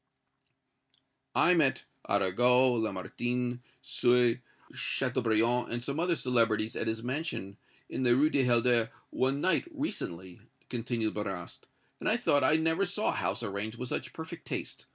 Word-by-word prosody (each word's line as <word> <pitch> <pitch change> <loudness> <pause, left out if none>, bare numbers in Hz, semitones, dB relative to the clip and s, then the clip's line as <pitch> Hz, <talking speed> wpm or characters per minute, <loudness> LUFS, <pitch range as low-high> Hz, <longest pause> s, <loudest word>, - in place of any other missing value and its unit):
"I 180 - +5
met 150 -6 +2 0.3
Arago, 125 +6 +4
Lamartine, 120 +4 -2 0.2
Sue, 120 -1 +3 0.3
Châteaubriand 120 -2 +1
and 120 0 -2
some 140 +4 -3
other 175 0 +2
celebrities 115 -5 +1
at - - -2
his 110 0 -2
mansion 130 - -4 0.3
in - - -4
the 120 -2 +4
Rue 150 +4 +3
du 135 - +2
Helder 120 -1 +3 0.2
one 135 +2 0
night, 185 - +2
recently," 95 - -5 0.3
continued 115 -2 -2
Marrast, 95 -4 -6 0.3
"and - - -1
I - - +3
thought 145 - +2
I 155 - +4
never 160 +3 +2
saw 175 - 0
a - - +3
house - - -2
arranged 105 +3 -4
with 125 0 -5
such - - -3
perfect 160 0 -9
taste. - - -5
125 Hz, 145 wpm, -30 LUFS, 110-140 Hz, 0.3 s, I